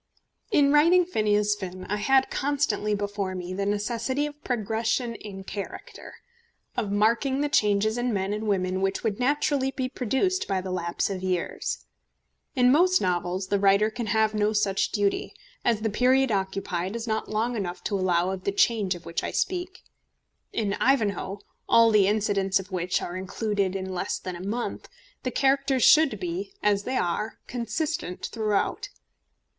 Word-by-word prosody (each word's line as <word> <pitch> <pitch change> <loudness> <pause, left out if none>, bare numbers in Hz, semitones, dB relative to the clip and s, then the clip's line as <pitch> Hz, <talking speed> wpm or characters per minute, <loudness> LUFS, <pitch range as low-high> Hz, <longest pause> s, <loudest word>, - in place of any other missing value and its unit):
In 285 - +4
writing 335 +5 +5
Phineas 210 - +2
Finn 185 -2 -7
I 210 - -2
had 265 +5 +3
constantly 250 -7 0
before 200 -2 -3
me 180 0 -5
the 200 +1 -2
necessity 230 +7 -1
of 295 0 -8
progression 230 +1 -1
in 200 -3 -9
character, 200 +1 -8 0.6
of 220 -5 -2
marking 235 +7 +2
the 295 - 0
changes 215 -3 +2
in 245 0 0
men 195 -1 -1
and 215 +1 -3
women 185 -2 0
which 195 0 -1
would 215 -2 -1
naturally 275 +1 +1
be 260 -1 -3
produced 270 - 0
by 195 -2 0
the 185 0 -5
lapse 175 +1 -1
of 190 -2 -4
years. 185 -2 -2 0.7
In 250 -1 +5
most 360 +6 +4
novels 180 +1 -1
the 200 - +2
writer 200 +2 +4
can 230 0 -4
have 220 0 +2
no 210 0 +1
such 200 -2 +1
duty, 205 -2 -1 0.3
as 230 -3 +1
the 220 - 0
period 255 +3 +3
occupied 190 -1 -2
is 235 0 -4
not 220 -2 -2
long 225 +3 -1
enough 185 -5 -4
to 205 - -1
allow 185 -1 +1
of 190 -1 -5
the 200 - 0
change 200 -2 +2
of 175 - -12
which 170 - -3
I - - -2
speak. 365 0 -2 0.7
In 205 -3 -1
Ivanhoe, 205 -6 +1 0.3
all 230 0 +6
the 205 -3 +5
incidents 200 -2 +1
of 190 +1 -9
which 180 0 -1
are 175 - -5
included 195 +1 -1
in 190 -1 -4
less 180 - -2
than 185 -1 -6
a 175 - -8
month, 225 +5 -4 0.3
the 255 - -2
characters 270 0 +2
should 315 -2 +6
be, 370 +2 -4
as 205 -1 +2
they 255 - -1
are, 195 +6 -1
consistent 250 - -3
throughout. 215 -3 -1
210 Hz, 170 wpm, -26 LUFS, 195-250 Hz, 0.7 s, all